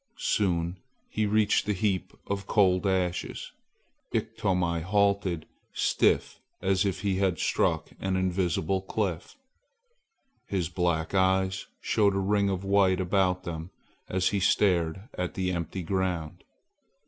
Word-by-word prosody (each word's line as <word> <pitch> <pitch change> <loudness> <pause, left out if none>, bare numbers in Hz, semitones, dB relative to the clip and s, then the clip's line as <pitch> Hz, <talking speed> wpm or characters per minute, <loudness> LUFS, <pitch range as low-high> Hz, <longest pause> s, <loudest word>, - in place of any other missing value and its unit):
Soon 90 -3 0 0.3
he 110 -1 0
reached 105 0 +2
the 105 - +2
heap 95 -2 -1
of 100 0 -3
cold 95 -2 +3
ashes. 90 -2 -1 0.6
Iktomi 85 -3 0
halted 100 -2 +1 0.3
stiff - - +1 0.2
as 95 +1 +1
if 95 -1 -1
he 95 -2 0
had 95 -3 +1
struck - - 0
an 95 0 -1
invisible 95 0 0
cliff. 95 - -3 1.1
His 90 -4 -1
black 85 -2 -1
eyes 95 0 +2
showed 100 -3 +2
a - - +1
ring 100 +1 +2
of 95 -1 -2
white 95 -1 +3
about 90 0 +1
them 80 -1 -5 0.4
as 95 0 +1
he 100 - 0
stared 90 -3 +2 0.2
at 90 -1 -2
the 90 -1 0
empty 85 +1 -3
ground. 90 -2 -2
95 Hz, 125 wpm, -28 LUFS, 90-100 Hz, 1.1 s, cold